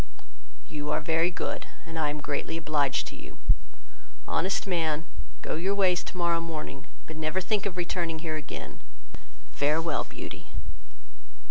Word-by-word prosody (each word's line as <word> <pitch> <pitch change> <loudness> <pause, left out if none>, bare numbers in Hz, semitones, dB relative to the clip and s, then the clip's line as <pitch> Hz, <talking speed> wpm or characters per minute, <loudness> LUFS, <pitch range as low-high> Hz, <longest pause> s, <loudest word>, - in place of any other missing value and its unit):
"You 150 -1 -3
are - - +3
very 165 +2 +4
good, 180 - -2 0.2
and 165 -1 -4
I 150 -2 +3
am 150 +1 -2
greatly 145 +3 0
obliged 145 -4 +2
to - - -9
you; - - -10 0.9
honest 190 +3 +2
man, 165 -4 +2 0.4
go - - -1
your 185 +5 +2
ways 185 -3 +5
tomorrow 170 -2 +2
morning, 155 -4 -4 0.2
but 160 - -7
never 155 +3 +1
think 200 +2 +2
of 185 -2 -4
returning 175 -2 0
here 160 -1 -2
again. 150 -2 -5 0.7
Farewell, 155 +3 +2
Beauty." - - -7
165 Hz, 140 wpm, -30 LUFS, 155-175 Hz, 0.9 s, ways